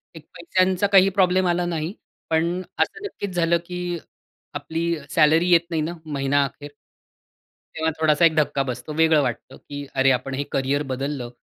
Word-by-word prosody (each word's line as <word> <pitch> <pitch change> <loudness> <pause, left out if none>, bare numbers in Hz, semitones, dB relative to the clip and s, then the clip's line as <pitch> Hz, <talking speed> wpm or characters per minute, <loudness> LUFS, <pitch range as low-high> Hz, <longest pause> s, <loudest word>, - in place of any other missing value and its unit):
एक 160 -2 -12
पैश्यांचा 185 +3 +1
काही 195 -1 +6
प्रॉब्लेम 185 -1 +2
आला 175 0 +1
नाही. 170 +1 -3 0.4
पण 170 +3 0 0.2
असं 435 - -1
नक्कीच 205 - -5
झालं, 170 0 +3
की 180 -1 -4 0.6
आपली 170 +1 -2
सॅलरी 160 +3 +4
येत 170 -1 +6
नाही 160 -2 0
ना, 165 +3 -3
महिना 140 -1 +1
अखेर 145 +1 -10 1.0
तेव्हा 160 0 0
थोडासा 155 +1 +4
एक 160 -1 +3
धक्का 145 -2 +1
बसतो 125 +5 -5
वेगळं 160 -1 +4
वाटतं, 120 -4 -4
की 145 0 -8
"अरे! 135 0 +4
आपण 130 +1 -1
हे 145 - -2
करियर 140 +2 0
बदललं, 135 -2 -4
160 Hz, 165 wpm, -23 LUFS, 145-175 Hz, 1.0 s, काही